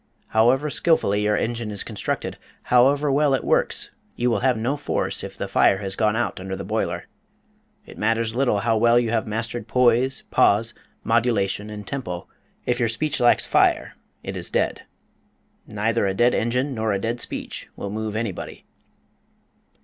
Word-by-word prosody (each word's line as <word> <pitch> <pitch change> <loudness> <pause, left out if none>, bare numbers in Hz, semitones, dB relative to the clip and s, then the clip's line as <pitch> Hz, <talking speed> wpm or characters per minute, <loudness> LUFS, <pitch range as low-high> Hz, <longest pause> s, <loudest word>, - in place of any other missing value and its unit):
However 130 +7 +3
skillfully 105 -13 +2
your 105 0 +2
engine 115 -1 -2
is 100 -2 -4
constructed, - - -4 0.2
however 140 +4 +4
well 140 0 +3
it - - -3
works, - - +1 0.2
you 120 0 +1
will - - +1
have 130 -2 +2
no 120 +6 -1
force 145 - -2
if - - -8
the - - -3
fire 95 - +4
has 95 -1 -3
gone 110 -1 +1
out 120 -4 -1
under 95 +1 -5
the - - -6
boiler. - - -2 0.8
It - - -13
matters 115 +1 +1
little 120 -5 +1
how 115 0 +2
well 120 +2 +4
you 115 -2 -1
have 115 -1 0
mastered 115 +1 -3
poise, 125 +2 +2
pause, 110 +3 +3 0.3
modulation, 110 -3 +1
and 105 -1 -7
tempo, 95 -11 -5 0.4
if 125 0 0
your 120 -2 +2
speech 150 +6 -2
lacks 120 - +4
fire - - +2 0.3
it - - -5
is - - -3
dead. - - -1 0.8
Neither 105 0 0
a 95 - -1
dead 120 +3 +3
engine 125 +4 0
nor 110 -2 -1
a 100 - 0
dead 115 +3 -2
speech - - -5
will 100 - -5
move 110 0 -3
anybody. 110 -4 -5
115 Hz, 170 wpm, -23 LUFS, 105-125 Hz, 0.8 s, however